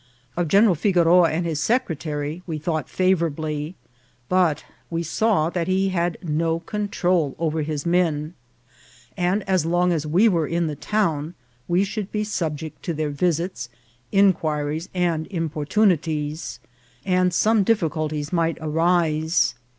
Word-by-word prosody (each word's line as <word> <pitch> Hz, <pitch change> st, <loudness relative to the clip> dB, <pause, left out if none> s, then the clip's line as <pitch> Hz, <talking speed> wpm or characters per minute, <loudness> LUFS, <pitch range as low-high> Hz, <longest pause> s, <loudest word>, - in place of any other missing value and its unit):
Of 175 Hz, -1 st, 0 dB
General 200 Hz, +4 st, +5 dB
Figoroa 175 Hz, -1 st, +4 dB
and 170 Hz, +2 st, -1 dB
his 160 Hz, -3 st, -2 dB
secretary 155 Hz, -, -1 dB
we 160 Hz, -2 st, -3 dB
thought 155 Hz, -2 st, -2 dB
favourably; 160 Hz, -3 st, 0 dB, 0.5 s
but 180 Hz, -5 st, +2 dB, 0.2 s
we 170 Hz, 0 st, -2 dB
saw 170 Hz, -1 st, +1 dB
that 175 Hz, -2 st, -2 dB
he 190 Hz, +1 st, +1 dB
had 175 Hz, -2 st, -1 dB
no 165 Hz, +1 st, 0 dB
control 180 Hz, -6 st, -1 dB
over 160 Hz, -1 st, -1 dB
his 150 Hz, -1 st, -3 dB
men, 165 Hz, -3 st, +1 dB, 0.8 s
and 190 Hz, +2 st, 0 dB
as 185 Hz, -4 st, +2 dB
long 175 Hz, +2 st, +2 dB
as 155 Hz, -2 st, -2 dB
we 180 Hz, +9 st, +4 dB
were 170 Hz, -7 st, +1 dB
in 170 Hz, 0 st, 0 dB
the 155 Hz, -2 st, -3 dB
town 165 Hz, -4 st, -1 dB, 0.3 s
we 175 Hz, +3 st, +2 dB
should 200 Hz, 0 st, -4 dB
be 210 Hz, 0 st, -1 dB
subject 160 Hz, -7 st, -4 dB
to 170 Hz, -, -2 dB
their 150 Hz, -1 st, -2 dB
visits, 170 Hz, -4 st, -1 dB, 0.4 s
inquiries, 160 Hz, -5 st, +1 dB
and 170 Hz, -3 st, 0 dB
importunities, 160 Hz, -2 st, -1 dB, 0.5 s
and 180 Hz, -1 st, +2 dB
some 215 Hz, +5 st, +3 dB
difficulties 155 Hz, -7 st, -1 dB
might 165 Hz, -1 st, +1 dB
arise. 160 Hz, 0 st, +1 dB
170 Hz, 135 wpm, -23 LUFS, 155-185 Hz, 0.8 s, General